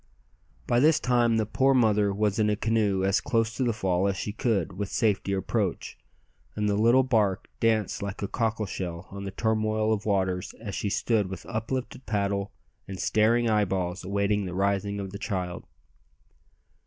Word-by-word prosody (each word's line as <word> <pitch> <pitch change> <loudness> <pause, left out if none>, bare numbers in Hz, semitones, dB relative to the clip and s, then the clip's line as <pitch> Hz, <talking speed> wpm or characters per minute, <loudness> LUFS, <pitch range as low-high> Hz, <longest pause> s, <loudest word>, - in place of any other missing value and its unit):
By 120 - +2
this 155 +3 +5
time 120 -4 +2
the 110 - +1
poor 135 +5 +2
mother 105 -4 +3
was 105 +1 0
in 105 -1 +3
a 105 - +2
canoe 105 -3 +1
as 95 0 +2
close 115 -1 0
to 130 - -1
the 120 - +2
fall 95 -3 0
as 100 -1 -1
she 105 - -3
could 110 - 0
with 100 +2 -4
safety 105 -4 0
approach, 95 -1 -2 0.6
and 105 0 0
the 105 - +2
little 115 +5 +4
bark 110 -7 +1
danced 110 -3 +1
like 100 +1 -5
a - - -1
cockle 110 -1 -1
shell 90 -2 -5
on 100 0 -6
the 95 - -4
turmoil 110 +1 +1
of 105 0 -3
waters 95 -3 0
as 105 -3 -6
she 105 - -2
stood 105 0 +1
with 95 -2 -7
uplifted 120 +3 -4
paddle 100 -2 -1 0.4
and 95 -1 -7
staring 115 +2 +2
eyeballs 95 -4 0
awaiting 100 +1 0
the 90 -1 -5
rising 100 +1 0
of 95 -1 -5
the 100 - -7
child. 90 -4 -4
105 Hz, 180 wpm, -27 LUFS, 95-110 Hz, 0.6 s, this